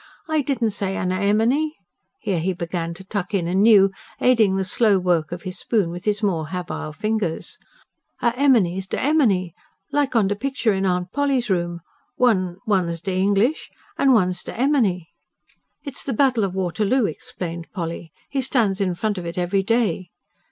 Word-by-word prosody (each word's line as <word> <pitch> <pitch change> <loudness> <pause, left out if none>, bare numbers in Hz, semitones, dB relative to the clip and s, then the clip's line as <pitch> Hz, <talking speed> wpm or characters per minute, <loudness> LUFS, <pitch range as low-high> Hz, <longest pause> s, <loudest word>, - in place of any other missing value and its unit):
"I 315 -1 +1
didn't 255 -5 0
say 195 -1 -2
anner 185 +1 -1
emeny." 235 +10 +2 0.5
Here, 195 -6 -1
he 185 +4 0
began 170 -1 -4
to 190 - -10
tuck 195 0 -3
in 175 -3 0
anew, 195 +1 +5 0.3
aiding 225 -6 +4
the 190 0 0
slow 205 +1 +3
work 175 -4 +1
of 175 0 -6
his 185 -1 -6
spoon 205 -8 0
with 175 +2 -8
his 210 0 +1
more 165 -6 0
habile 175 -3 -5
fingers. 205 0 -2 0.6
"A 235 - +2
emeny's 205 -9 +2
d - - -3
emeny. 225 - +2 0.4
Like 285 -3 0
on 215 -4 +4
de 205 - 0
pickshur 250 -1 0
in 190 0 0
Aunt 180 0 -1
Polly's 275 -6 0
room. 175 -1 -1 0.3
One... 185 -8 +2
one's 180 -6 +1
de 185 +2 -3
English, 200 +9 +1 0.3
an' 275 - +3
one's 185 -6 +2
de - - -7
emeny." 225 - +1 0.7
"It's 280 -4 -5
the 270 - -2
Battle 255 -2 +2
of 190 -1 -4
Waterloo," 195 +7 +1
explained 170 0 -5
Polly. 170 -3 -5 0.2
"He 275 - -1
stands 220 -7 +1
in 185 -3 0
front 205 +2 -1
of 175 - -7
it 170 +2 -6
every 180 +2 +1
day." 195 -5 0
195 Hz, 175 wpm, -22 LUFS, 180-230 Hz, 0.7 s, anew